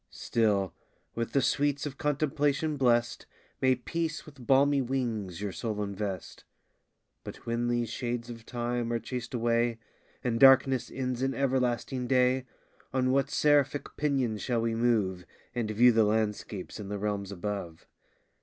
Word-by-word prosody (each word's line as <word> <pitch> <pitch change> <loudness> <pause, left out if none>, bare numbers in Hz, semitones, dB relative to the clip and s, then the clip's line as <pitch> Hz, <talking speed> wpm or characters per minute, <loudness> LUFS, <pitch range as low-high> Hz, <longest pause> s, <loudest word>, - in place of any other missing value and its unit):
Still, 100 -5 0 0.4
with 115 0 -3
the 140 - +3
sweets 145 +2 +1
of 140 -2 -6
contemplation 150 +1 0
bless'd, 120 -3 +1 0.3
May 130 -1 +4
peace 160 +5 -3
with 140 -5 -13
balmy 140 +1 +4
wings 115 -8 -2
your 105 -1 -2
soul 105 +4 -3
invest! 100 -2 -5 0.8
But - - -10
when 120 +1 -1
these 120 -1 0
shades 120 0 -3
of 115 -2 -9
time 120 0 -2
are 120 - +1
chas'd 120 +2 -5
away, 115 0 +1 0.5
And 115 -2 0
darkness 135 -1 +6
ends 130 -2 -3
in 135 0 0
everlasting 130 -1 0
day, 125 0 +2 0.4
On 130 -1 +1
what 135 0 +2
seraphic 145 -1 +2
pinions 130 -8 0
shall 120 -3 0
we 115 0 0
move, 110 -6 +1 0.3
And 120 -3 -2
view 120 +4 +6
the 115 -1 +4
landscapes 105 -2 -2
in 100 -2 -6
the 105 - -3
realms 100 -1 -2
above? 95 -3 -5
120 Hz, 145 wpm, -29 LUFS, 110-135 Hz, 0.8 s, darkness